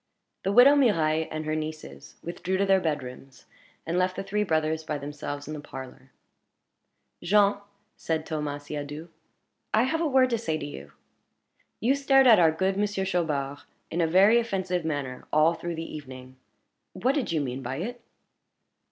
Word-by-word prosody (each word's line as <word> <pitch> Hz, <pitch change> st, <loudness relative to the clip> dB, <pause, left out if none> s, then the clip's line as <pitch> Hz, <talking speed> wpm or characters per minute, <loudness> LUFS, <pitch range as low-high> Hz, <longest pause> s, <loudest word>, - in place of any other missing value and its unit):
The 195 Hz, -, -1 dB
widow 245 Hz, +7 st, +8 dB
Mirailhe 160 Hz, -, +2 dB
and 155 Hz, 0 st, -5 dB
her 155 Hz, 0 st, -1 dB
nieces 155 Hz, 0 st, -7 dB
withdrew 180 Hz, +2 st, -3 dB
to 200 Hz, -, +2 dB
their 195 Hz, -1 st, +4 dB
bedrooms, 135 Hz, -5 st, -5 dB, 0.4 s
and 170 Hz, +2 st, 0 dB
left 185 Hz, 0 st, +1 dB
the -, -, -4 dB
three 205 Hz, +2 st, -1 dB
brothers 160 Hz, -3 st, 0 dB
by 150 Hz, -1 st, -3 dB
themselves 145 Hz, 0 st, -6 dB
in 155 Hz, -, -5 dB
the 150 Hz, -, -6 dB
parlor. 135 Hz, -2 st, -10 dB, 1.1 s
"Jean," 200 Hz, +2 st, +3 dB, 0.4 s
said 160 Hz, -1 st, -2 dB
Thomas 150 Hz, -2 st, -4 dB
Siadoux, 150 Hz, +2 st, -6 dB, 0.7 s
"I 220 Hz, -, +4 dB
have 320 Hz, +6 st, 0 dB
a 330 Hz, -, +1 dB
word 260 Hz, -2 st, +3 dB
to 230 Hz, -, +1 dB
say 160 Hz, -8 st, -2 dB
to -, -, -6 dB
you. 70 Hz, -, -9 dB, 0.9 s
You 245 Hz, +4 st, +3 dB
stared 275 Hz, -1 st, +4 dB
at 230 Hz, -5 st, +8 dB
our 165 Hz, -2 st, +5 dB
good 190 Hz, +4 st, -1 dB
Monsieur 205 Hz, -2 st, -1 dB
Chaubard 150 Hz, -7 st, -1 dB, 0.3 s
in 170 Hz, -, 0 dB
a 165 Hz, -, +2 dB
very 195 Hz, +7 st, +5 dB
offensive 190 Hz, -6 st, -2 dB
manner 145 Hz, -5 st, -4 dB
all 155 Hz, +2 st, +4 dB
through 170 Hz, 0 st, -5 dB
the 165 Hz, 0 st, -6 dB
evening. 130 Hz, -3 st, -10 dB, 0.6 s
What 245 Hz, +9 st, +1 dB
did 280 Hz, -, -1 dB
you 160 Hz, -, +1 dB
mean 130 Hz, -2 st, -3 dB
by 130 Hz, +1 st, -4 dB
it?" 235 Hz, -, -5 dB
165 Hz, 170 wpm, -27 LUFS, 150-200 Hz, 1.1 s, widow